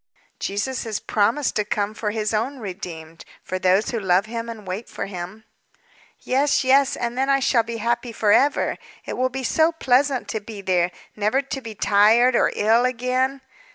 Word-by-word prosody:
"Jesus 215 +6 -2
has 220 -2 -3
promised 230 +7 0
to 210 - +2
come 205 0 -2
for 220 -1 -3
His 215 0 -2
own 240 +6 -1
redeemed 170 -6 -8 0.2
for 185 - -4
those 185 +3 +2
who 235 - -2
love 190 0 +2
Him 230 +1 -5
and 220 -3 -8
wait 190 +5 -5
for - - -5
Him." 190 +3 -7 0.7
"Yes, 280 +2 +1
yes, 270 +1 +4
and 240 0 -3
then 265 +2 0
I 275 0 +4
shall 260 -3 +3
be 230 +1 -6
happy 235 +2 -1
forever. 225 +6 +2 0.3
It - - -4
will 255 0 +1
be 265 +1 -5
so 320 +6 +3
pleasant 270 -3 +1
to 220 - -2
be 210 0 -9
there, 180 -2 +1 0.3
never 215 +6 +1
to 270 0 -5
be 225 -3 -8
tired 220 +6 +4
or - - +3
ill 225 +3 +3
again." 255 +2 0
230 Hz, 185 wpm, -22 LUFS, 205-255 Hz, 0.7 s, yes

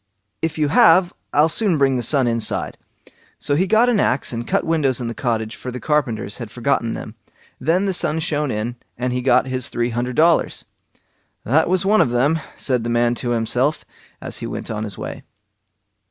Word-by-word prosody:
"If 165 -1 -2
you 150 -2 +1
have, 190 -2 +5 0.2
I'll 150 +2 +4
soon 185 0 +1
bring 135 -2 +3
the 125 - -1
sun 135 +3 +1
inside." 115 -2 -1 0.6
So 145 - -1
he 185 +6 +1
got 220 +4 +4
an 240 -4 +2
axe 130 -8 0
and 115 0 -4
cut 195 - +1
windows 150 -6 +1
in 120 - -4
the 115 - -3
cottage, 110 -3 -2
for 130 - -7
the 125 0 -6
carpenters 115 -8 -1
had 115 -3 -6
forgotten 115 0 -1
them; - - -7 0.5
then 170 +8 +1
the 195 - 0
sun 160 -3 +1
shone 150 -2 -1
in, 120 +2 -3 0.2
and 125 +1 -2
he 125 - -1
got 125 0 +3
his 130 -1 -2
three 120 0 -1
hundred 120 +2 -2
dollars. 165 +3 +2 0.8
"That 155 +8 +2
was 185 0 +1
one 210 -1 +4
of 150 - +2
them", 135 +7 +2 0.2
said 125 -4 -1
the 120 - -3
man 120 0 +2
to 120 - -2
himself, 120 +5 0 0.3
as - - -4
he - - -5
went - - -5
on 110 0 -3
his 100 -3 -6
way. - - -6
130 Hz, 200 wpm, -20 LUFS, 120-160 Hz, 0.8 s, have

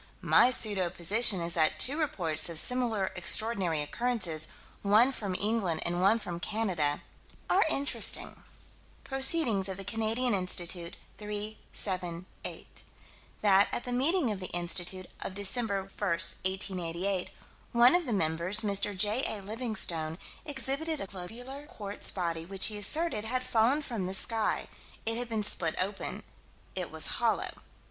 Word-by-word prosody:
My 245 - +5
pseudo 205 -7 +2
position 195 +3 +2
is 170 0 -1
that 155 -2 +1
two 275 - +3
reports 175 - +1
of 165 - 0
similar 225 -2 +3
extraordinary 190 -4 +3
occurrences, 180 -4 0 0.3
one 215 +6 +4
from 200 -8 -4
England 200 -5 0
and 175 +1 -1
one 200 +4 +4
from 175 -6 -6
Canada 180 -9 -1 0.5
are 390 - +5
interesting. 285 -2 +1 0.6
Proc. 270 0 -5 0.6
Canadian 225 +3 0
Institute, 180 -2 -1 0.2
3 210 0 -5 0.2
7 180 -3 -1 0.2
8: - - -8 0.6
That, 200 -1 +5
at - - -3
the 250 - -5
meeting 280 +1 +2
of 205 - -4
the 185 - -4
Institute, 175 +1 -1 0.2
of 190 - -5
Dec. 200 +2 0
1, 240 -2 -1
1888, 190 -1 -1 0.4
one 240 +1 +6
of 350 -4 +1
the - - -2
members, 170 +2 +1
Mr. 200 -1 -1
J.A. 215 +2 +1
Livingstone, 190 -8 -3 0.3
exhibited 290 +3 -2
a - - -4
globular 245 +10 -8
quartz 205 -5 0
body 170 -3 -2
which 190 +2 +2
he 215 - 0
asserted 300 - 0
had 255 +3 -1
fallen 255 +6 +2
from 225 -9 -3
the 190 - -1
sky. 225 +2 0 0.4
It 225 0 +1
had 245 -1 -4
been 220 -2 -1
split 170 -5 +2
open. 195 +2 -2 0.5
It - - -3
was - - +1 0.2
hollow. - - +1
205 Hz, 140 wpm, -30 LUFS, 180-235 Hz, 0.6 s, one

